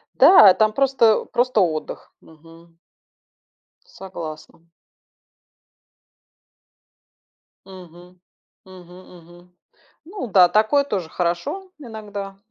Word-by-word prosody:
Да! 210 - +7
Там 215 0 0
просто, 265 -5 +1
просто 245 -3 -1
отдых. 160 -4 -5
Мгм. 165 +1 -20 1.1
Согласна. 170 -3 -11 3.0
Мгм, 180 -1 -16 0.5
мгм-мгм. 180 -1 -17 0.5
Ну 360 - -8
да, 185 -3 +4
такое 220 +9 +1
тоже 190 - -5
хорошо 175 - -4
иногда. 205 -6 -9
185 Hz, 70 wpm, -20 LUFS, 175-220 Hz, 3.0 s, Да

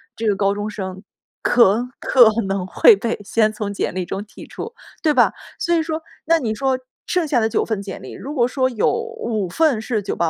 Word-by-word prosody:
这 225 - -2
个 205 - +3
高 195 0 +1
中 205 +1 -3
生 190 -3 -6 0.4
可 235 +1 +3
可 245 -4 +6 0.2
能 195 -1 -1
会 445 - +6
被 235 - -3
先 215 +1 +2
从 210 -1 -4
简 195 - -2
历 185 -1 -2
中 195 +3 -4
剔 210 +1 -12
除， 460 - -7 0.3
对 310 - +3
吧？ 250 -4 +4 0.3
所 345 - 0
以 330 - +2
说， 320 0 -4 0.2
那 330 +1 +4
你 230 -7 -1
说 265 +3 0 0.3
剩 355 -3 0
下 275 -4 +2
的 220 - +1
9 - - 0
份 220 -3 -2
简 195 -2 -7
历， - - -9
如 285 - -7
果 240 -3 +3
说 260 0 0
有 230 -5 +1
5 455 - -3
份 295 - +2
是 220 -1 -1
985、 200 - -3
225 Hz, 215 characters per minute, -20 LUFS, 205-285 Hz, 0.4 s, 可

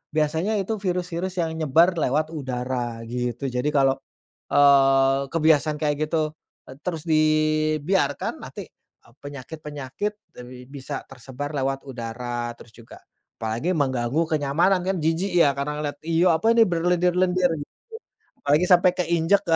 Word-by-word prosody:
biasanya 160 +7 +1
itu 215 +3 -3
virus-virus 180 -1 -2
yang 165 - -1
nyebar 160 +4 +4
lewat 155 +3 0
udara 125 -4 -4
gitu. 120 +2 -3
Jadi 125 +3 -1
kalau, 135 -1 +3 0.5
eee, 135 -1 +5
kebiasaan 155 -2 +2
kayak 150 -1 0
gitu, 155 -1 -1 0.3
eee, 130 - -10
terus 165 -4 -3
dibiarkan 155 +2 +1
nanti, - - -8
eee, 115 - -29
penyakit-penyakit 145 +5 -6 0.3
bi 125 0 -12
bisa 140 0 -6
tersebar 135 +3 -7
lewat 135 0 -2
udara 120 -1 -4
terus 115 - -16
juga 115 -1 -14 0.4
apalagi 115 +9 -2
mengganggu 130 -2 0
kenyamanan. 160 +6 +2
Kan 185 +1 -1
jijik 165 +4 0
ya 160 -5 +4
karena 150 +2 -3
lihat, 145 - -4
iyuh, 165 +2 +3
apa 220 +8 +2
ini 225 - +7
berlendir-lendir 180 +1 +2
gitu, 145 - -11 0.7
apalagi 150 +5 +3
sampai 180 0 +5
keinjak, 170 +2 +2
150 Hz, 130 wpm, -24 LUFS, 135-170 Hz, 0.7 s, ini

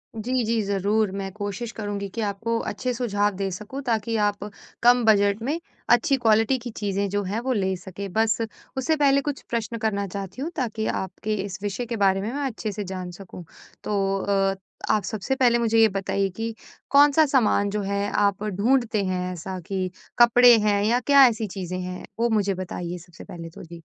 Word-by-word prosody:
जी, 245 +3 -1
जी, 225 0 +1
ज़रूर 200 +1 +1
मैं 195 -1 -4
कोशिश 205 +3 -5
करूँगी 205 -2 -4
कि 230 - -3
आपको 225 +3 -2
अच्छे 255 -1 -2
सुझाव 205 -4 0
दे 195 -1 -1
सकूँ 215 +9 -6
ताकि 225 -1 0
आप 205 0 -2 0.5
कम 245 0 +6
बजट 205 0 +4
में 295 +8 -1 0.3
अच्छी 240 +4 +4
क्वालिटी 225 +2 +3
की 240 +1 -7
चीज़ें 200 -2 -2
जो 205 +1 0
हैं, 200 +4 -2
वो 255 +2 -1
ले 190 -3 0
सकें 190 +2 -8
बस 220 0 +2 0.4
उससे 315 +5 +1
पहले 280 -2 +3
कुछ 285 -1 -4
प्रश्न 230 0 -2
करना 200 -3 -1
चाहती 195 +6 -6
हूँ 320 - -2
ताकि 225 -5 -2 0.2
आपके 215 +3 -4
इस 195 -1 -7
विषय 205 +4 -2
के 230 0 -4
बारे 195 -1 +3
में 220 +4 -3
मैं 285 0 -2
अच्छे 220 -4 -3
से 205 +1 -4
जान 185 -1 -6
सकूँ। 180 -1 -10 0.4
तो 195 -1 0
अ, 195 -1 +1 0.4
आप 210 -3 +2
सबसे 220 +6 -2
पहले 245 -3 +4
मुझे 225 -1 +2
ये 225 - +7
बताइए 195 0 -1
कि 225 0 -3 0.4
कौन-सा 290 +2 +6
सामान 230 -7 +2
जो 210 0 -2
है 200 +1 -1
आप 200 0 +1
ढूँढ़ते 215 +1 +1
हैं 185 -1 -2
ऐसा 185 +2 -6
कि 190 -2 -2 0.3
कपड़े 240 0 +8
हैं 205 -1 +2
या 235 +4 +3
क्या 275 +1 +7
ऐसी 225 -2 -1
चीज़ें 185 -1 -5
हैं 180 0 -6
वो 235 0 +2
मुझे 205 -3 +1
बताइए 180 -1 -5
सबसे 175 -1 -13
पहले 165 -1 -8
तो - - -12
जी? 170 0 -11
210 Hz, 195 wpm, -24 LUFS, 195-235 Hz, 0.5 s, कपड़े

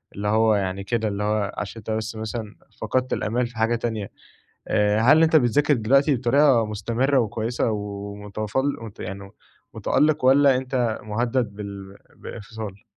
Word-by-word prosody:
اللي 105 +1 -3
هو 110 +1 +3
يعني 95 -1 -2
كده 110 +1 -1
اللي 105 0 -3
هو 105 -1 0
عشان 105 +2 -5
أنت 110 0 -6
بس 110 +1 -3
مثلًا 110 0 -5 0.3
فقدت 130 +4 -1
الآمال 120 +3 -1
في 120 -1 -15
حاجة 115 +1 +2
تانية، 110 -4 -4 0.6
آآ، 105 0 +2
هل 145 +8 +6
أنت 160 0 +4
بتذاكر 145 +2 +3
دلوقتي 135 +5 +3
بطريقة 125 -1 +3
مستمرة 120 +6 0
وكويسة 115 +1 -1
ومتفل 105 +5 -3 0.2
يعني 100 +1 -7 0.4
متألق 150 -2 +1
والّا 135 +1 +5
أنت 125 -3 -1
مهدد 115 +1 -1
بال 100 -1 -8 0.2
بالإنفصال؟ 105 -2 -8
110 Hz, 145 wpm, -23 LUFS, 105-125 Hz, 0.6 s, هل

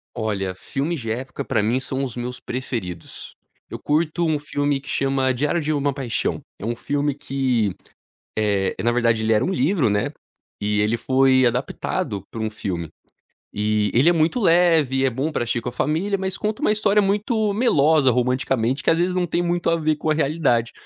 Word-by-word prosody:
Olha, 100 -5 -2
filmes 150 - -3
de 115 -2 -5
época 130 +3 -5
pra - - 0
mim 115 +5 +1
são 130 0 -3
os 125 -4 -4
meus 125 +1 -5
preferidos. 115 -8 -6 0.3
Eu - - -5
curto 160 +3 0
um 155 -2 +1
filme 145 -1 -1
que 135 - -14
chama 135 -1 +1
Diário 145 +6 0
de 155 0 -1
uma 145 -1 0
paixão, 130 -5 -2 0.2
é 105 - -6
um 120 - -1
filme 145 +3 -1
que, 130 -7 0 0.6
eh, 100 -3 +1
na 120 - +2
verdade 115 -2 +2
ele 110 0 +2
era 110 - +3
um 190 - 0
livro, 155 - +2
né, 105 0 0 0.5
e 105 0 0
ele 105 +3 +2
foi 130 +1 +3
adaptado 125 - -2
pra 115 - -6
um 110 0 -1
filme. 90 -6 -4 0.6
E 105 0 0
ele 130 +8 +5
é - - +6
muito 165 +8 +1
leve, 165 - +3
é 135 - +3
bom 135 +6 -2
pra 150 - -1
agir 120 0 -1
com 120 - -5
a - - -5
família, 165 +10 0
mas 190 0 -3
conta 215 0 -3
uma - - +3
história 210 -1 +3
muito 210 +2 +1
melosa 155 - +4
romanticamente 125 +1 0
que - - +3
às 165 - +2
vezes 180 +1 +1
não 180 -1 +1
tem 175 +1 0
muito 175 0 0
a 165 - +2
ver 155 -1 0
com 155 +1 -2
a - - +3
realidade, 140 -6 +1
135 Hz, 200 wpm, -22 LUFS, 115-160 Hz, 0.6 s, é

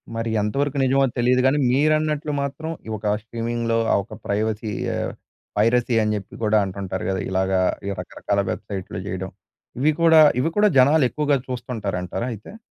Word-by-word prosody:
మరి 115 0 -2
ఎంతవరకు 140 +6 -1
నిజమో 135 +1 +3
తెలీదు 125 +1 +3
గాని 140 +3 +3
మీరన్నట్లు 155 +1 +1
మాత్రం 140 +3 -4 0.2
ఈ - - -6
ఒక 105 0 0
స్ట్రీమిం‌గ్‌లో 115 0 -2 0.2
ఆ - - +4
ఒక - - -13
ప్రైవసీ 110 +1 -1 0.2
ఆహ్, - - -2 0.5
పైరసీ 120 +2 +2
అని 105 0 0
జెప్పి 100 -2 -7
గూడా 105 0 +4
అంటుంటారు 95 0 -5
గదా! 95 -1 -1
ఇలాగ 95 0 0 0.5
రకరకాల 100 -1 -2
వెబ్‌సైట్లు 95 -3 -5
జేయడం. 95 -1 -4 0.5
ఇవి 155 +3 +4
కూడా, 160 -1 +7 0.2
ఇవి 165 - 0
కూడా 210 0 +5
జనాలెక్కువగా 145 +1 +3
చూస్తుంటారంటారా 115 -4 -3
అయితే? 110 - -11
120 Hz, 145 wpm, -22 LUFS, 105-140 Hz, 0.5 s, కూడా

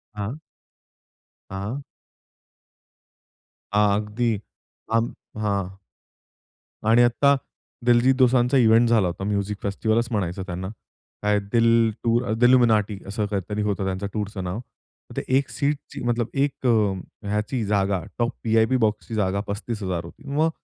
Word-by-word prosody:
हां. 105 +8 -4 1.1
हां. 100 +8 -4 1.9
अगदी 105 +3 +2 0.6
अम 115 +1 +1 0.3
हां. 100 -2 -2 1.1
आणि 115 +2 +6
आत्ता 140 +4 +4 0.5
दलजित 120 +2 +5
दोसांचा 130 0 +4
इव्हेंट 115 -1 +5
झाला 110 -5 +4
होता 85 +2 -4
म्युझिक 100 0 -1
फेस्टिव्हलचं 110 +3 0
म्हणायचं 95 -3 -2
त्यांना 90 +1 -4 0.6
काय 105 0 +3
दिल 115 -1 +4
टू 115 0 +3
अ, 110 - -1
दिलुमिनाटी 115 -5 +4
असं 105 +2 -2
काहीतरी 105 +1 -3
होतं 100 -2 -1
त्यांचा 95 +1 -2
टूरचं 105 -2 -3
नाव. 90 +4 -3 0.6
ते - - +1 0.2
1 140 - 0
सीटची 145 0 -3
मतलब 120 -1 0
1 140 -1 -1
ह्याची 105 +1 0
जागा 100 -2 +1 0.2
टॉप 120 0 +2 0.2
वी-आय-पी 115 +3 +3
बॉक्सची 110 -1 -1
जागा 100 -2 +1
35000 100 -5 -3
होती. 85 - -13
मग 150 +3 +2
110 Hz, 120 wpm, -24 LUFS, 100-120 Hz, 1.9 s, आणि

